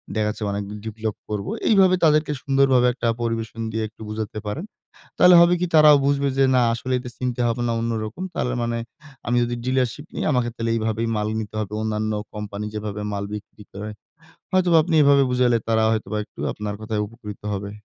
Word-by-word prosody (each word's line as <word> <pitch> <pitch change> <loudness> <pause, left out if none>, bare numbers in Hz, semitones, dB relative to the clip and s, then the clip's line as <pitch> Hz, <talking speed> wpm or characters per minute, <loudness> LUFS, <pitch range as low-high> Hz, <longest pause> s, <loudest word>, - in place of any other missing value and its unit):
দেখা 105 -1 +1
যাচ্ছে 105 0 -5
অনেক 100 0 -2 0.2
ডেভেলপ 110 -1 -4
করব। 105 -1 -3 0.2
এইভাবে 190 -3 +5
তাদেরকে 150 -1 +4
সুন্দরভাবে 135 -3 +3
একটা 120 -2 -2
পরিবেশন 115 -1 -3
দিয়ে 110 0 -2
একটু 110 - -19
বুঝাতে 110 0 -4
পারেন। 150 - -4 0.5
তাহলে 180 0 +7
হবে 170 +1 +5
কি 180 - +1
তারাও 150 -1 +8
বুঝবে 140 0 +2
যে, 135 - +5
না 125 - +5
আসলে 130 +2 -3
এটা 125 -1 -7
চিন্তা 125 -1 -2
ভাবনা 120 0 -1
অন্যরকম। 115 - -3
তাহলে 125 - -1
মানে 115 0 -1 0.5
আমি 120 +1 +2
যদি 120 0 -2
ডিলারশিপ 130 +2 0
নি - - -4
আমাকে 125 -2 +1
তাইলে 115 0 -2
এইভাবেই 110 +1 -1
মাল 105 0 -1
নিতে 110 -1 -6
হবে। 105 -1 -4
অন্যান্য 110 0 -1 0.2
কোম্পানি 105 0 -5
যেভাবে 105 -1 -4
মাল 100 0 -2
বিক্রি 105 0 -9
করে। 105 +2 -6 0.6
হয়তোবা 180 -3 +4
আপনি 165 0 0
এভাবে 140 -1 +5
বুঝালে 125 -2 +3
তারা 110 -1 +2
হয়তোবা 110 -1 -2
একটু - - -20
আপনার 105 -1 -4
কথায় 110 -1 -2
উপকৃত 105 -1 -10
হবে। 100 +1 -4
115 Hz, 185 wpm, -23 LUFS, 105-135 Hz, 0.6 s, তারাও